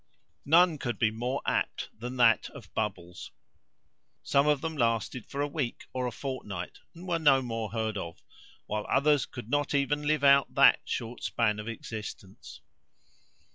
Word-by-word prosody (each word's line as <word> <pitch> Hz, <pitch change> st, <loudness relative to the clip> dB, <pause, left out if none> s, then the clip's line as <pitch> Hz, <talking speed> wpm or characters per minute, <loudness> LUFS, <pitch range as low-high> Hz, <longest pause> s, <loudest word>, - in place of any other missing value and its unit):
None 165 Hz, +1 st, +5 dB
could 120 Hz, -3 st, -3 dB
be 110 Hz, -3 st, +2 dB
more 125 Hz, +5 st, -3 dB
apt -, -, -1 dB
than 125 Hz, +3 st, -6 dB
that 115 Hz, -2 st, +4 dB
of -, -, -12 dB
Bubbles. 90 Hz, -5 st, -4 dB, 0.9 s
Some 140 Hz, +1 st, +2 dB
of 150 Hz, -2 st, +3 dB
them 160 Hz, -1 st, -3 dB
lasted 115 Hz, -1 st, -1 dB
for 140 Hz, -, -4 dB
a 145 Hz, -, +1 dB
week 140 Hz, -5 st, -3 dB
or 125 Hz, -1 st, -1 dB
a -, -, -3 dB
fortnight, 105 Hz, -10 st, -6 dB, 0.2 s
and 175 Hz, +3 st, -10 dB
were 170 Hz, -2 st, 0 dB
no 135 Hz, -4 st, +4 dB
more 115 Hz, -3 st, -3 dB
heard 110 Hz, -2 st, -2 dB
of, 85 Hz, -2 st, -8 dB, 0.4 s
while 105 Hz, 0 st, -3 dB
others 145 Hz, 0 st, +3 dB
could 120 Hz, -4 st, -9 dB
not 145 Hz, 0 st, +1 dB
even 145 Hz, +1 st, 0 dB
live 155 Hz, -1 st, +1 dB
out 140 Hz, -1 st, +5 dB
that -, -, +7 dB
short 120 Hz, +1 st, -4 dB
span 105 Hz, -3 st, 0 dB
of 105 Hz, -, -6 dB
existence. 110 Hz, -4 st, -8 dB
125 Hz, 165 wpm, -29 LUFS, 110-145 Hz, 0.9 s, that